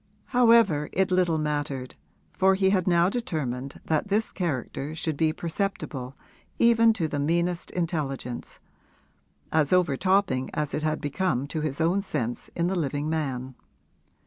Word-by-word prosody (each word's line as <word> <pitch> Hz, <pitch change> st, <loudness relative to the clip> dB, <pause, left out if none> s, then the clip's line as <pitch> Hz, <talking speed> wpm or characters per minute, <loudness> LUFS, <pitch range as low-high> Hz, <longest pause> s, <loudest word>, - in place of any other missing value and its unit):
However, 230 Hz, -11 st, +5 dB
it 190 Hz, 0 st, +1 dB
little 180 Hz, -3 st, +2 dB
mattered, 145 Hz, -4 st, -2 dB, 0.4 s
for 190 Hz, 0 st, +4 dB
he 190 Hz, 0 st, +3 dB
had 185 Hz, -2 st, +1 dB
now 170 Hz, -1 st, +4 dB
determined 140 Hz, -, -3 dB
that 155 Hz, +4 st, 0 dB
this 210 Hz, +2 st, 0 dB
character 150 Hz, -2 st, -3 dB
should 160 Hz, -1 st, -2 dB
be 155 Hz, +1 st, +2 dB
perceptible 160 Hz, -7 st, -4 dB, 0.4 s
even 230 Hz, -1 st, +5 dB
to 175 Hz, -7 st, -1 dB
the 145 Hz, -1 st, -3 dB
meanest 170 Hz, +4 st, 0 dB
intelligence 145 Hz, -8 st, -3 dB, 0.9 s
as 155 Hz, -3 st, +2 dB
overtopping 180 Hz, -4 st, +2 dB
as 150 Hz, -1 st, -2 dB
it 150 Hz, -, -1 dB
had 155 Hz, 0 st, -1 dB
become 145 Hz, -2 st, -1 dB
to 155 Hz, -, -3 dB
his 150 Hz, -2 st, -2 dB
own 170 Hz, +5 st, +2 dB
sense 125 Hz, -, -3 dB
in 170 Hz, -, 0 dB
the 185 Hz, +2 st, 0 dB
living 145 Hz, -2 st, -1 dB
man. 130 Hz, -5 st, -2 dB
160 Hz, 145 wpm, -26 LUFS, 145-185 Hz, 0.9 s, However